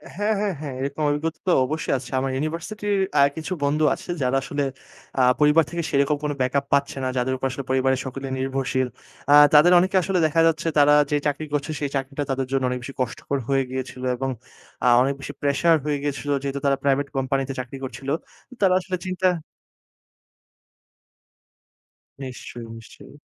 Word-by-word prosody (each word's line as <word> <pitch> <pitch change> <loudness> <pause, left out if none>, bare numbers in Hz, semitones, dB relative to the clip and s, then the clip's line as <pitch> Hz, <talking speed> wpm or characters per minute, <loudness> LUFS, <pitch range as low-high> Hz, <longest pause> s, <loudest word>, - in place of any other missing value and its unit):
হ্যাঁ, 210 +2 +1
হ্যাঁ, 205 -3 0
হ্যাঁ। 140 -4 -5
এরকম 140 +3 -3
অভিজ্ঞতা 155 +2 -2
তো - - +4
অবশ্যই 155 +1 -2
আছে। 130 -1 -9
আমার 135 0 -1
ইউনিভার্সিটির 175 +8 -2 0.2
আ - - +7 0.2
কিছু 160 +4 -3
বন্ধু 150 +2 +1
আছে - - -9
যারা 130 +1 +2
আসলে 145 0 -2 0.6
আ - - +5 0.2
পরিবার 150 +2 +5
থেকে 170 -1 -2
সেরকম 140 0 +2
কোনো 150 -1 -1
ব্যাকআপ 140 +2 +1
পাচ্ছে 140 0 +1
না, - - 0
যাদের 130 +1 0
উপর 135 - -4
আসলে 140 - -5
পরিবারের 130 0 +2
সকলে 135 +1 -5
নির্ভরশীল। 130 -1 -1 0.4
আ - - +8 0.2
তাদের 155 +4 +7
অনেকে 185 +2 0
আসলে 185 0 0
দেখা 165 +2 +2
যাচ্ছে 165 0 0
তারা 145 0 +6 0.2
যে 145 - +3
চাকরি 145 +2 -2
করছে 145 +1 -1
সেই 145 -2 -2
চাকরিটা 135 +2 -2
তাদের 135 -1 -1
জন্য 135 -1 +1
অনেক 125 0 -2
বেশি 135 - -7
কষ্টকর 130 +3 -2
হয়ে 135 -1 +2
গিয়েছিল 130 0 -5
এবং 135 +2 -2 0.6
আ - - +4
অনেক 135 +2 +2
বেশি 140 - -7
প্রেশার 145 +4 +3
হয়ে 150 -1 0
গিয়েছিল। 145 0 -3
যেহেতু 140 0 -2
তারা 135 -1 +3
প্রাইভেট 140 0 +2
কোম্পানিতে 135 +1 -1
চাকরি 125 +2 -6
করছিল। 135 +1 -6 0.5
তারা 190 -2 +5
আসলে 185 0 -4
চিন্তা 185 0 0 2.9
নিশ্চয়ই, 125 -2 -8
নিশ্চয়ই। 115 +5 -14
140 Hz, 175 wpm, -23 LUFS, 135-155 Hz, 2.9 s, আ